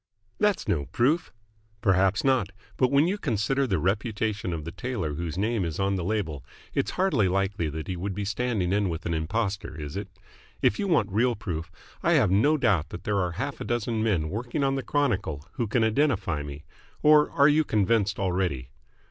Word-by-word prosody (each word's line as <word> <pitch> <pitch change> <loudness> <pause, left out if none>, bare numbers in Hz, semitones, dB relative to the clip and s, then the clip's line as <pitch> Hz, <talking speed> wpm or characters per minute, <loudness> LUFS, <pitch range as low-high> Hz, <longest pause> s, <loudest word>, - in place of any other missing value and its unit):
"That's 210 -2 +1
no 70 -4 0
proof." 150 +8 +1 0.5
"Perhaps 95 -2 +3
not. 130 -8 +2 0.3
But, 130 - +2
when 140 +3 +4
you 200 +3 -1
consider 135 - 0
the 95 -5 +1
reputation 105 - -1
of 80 -3 -4
the 85 - -5
tailor 105 -10 -3
whose 85 +1 -4
name 110 +1 0
is 80 -3 -3
on 100 0 +1
the 90 - -2
label, 85 - -2 0.3
it's - - 0
hardly 150 - +3
likely 95 -3 0
that 80 +1 -6
he 95 - -3
would 95 +2 -4
be 105 0 -3
standing 105 -3 -1
in 100 -2 +1
with 80 -1 -5
an 85 - -1
impostor, 95 +2 -2
is 75 -1 -6
it? 100 0 -4 0.5
If 105 - +2
you 200 - 0
want 120 - +2
real 120 +4 +2
proof, 80 -5 -5 0.3
I 170 - +3
have 125 - +4
no 145 +11 +4
doubt 95 - +2
that 85 - -8
there 100 -1 0
are 90 -2 -1
half 125 +10 -4
a - - -1
dozen 115 -1 -1
men 90 -9 0
working 120 +7 -2
on 135 0 +2
the 135 - -1
Chronicle 105 - -1
who 120 - -2
can 110 +2 +1
identify 110 - +1
me. 70 +1 -8 0.4
Or 150 0 +6
are 140 0 +4
you 155 +1 +4
convinced 105 -4 +1
already?" 90 -10 -1
100 Hz, 200 wpm, -26 LUFS, 90-125 Hz, 0.5 s, Or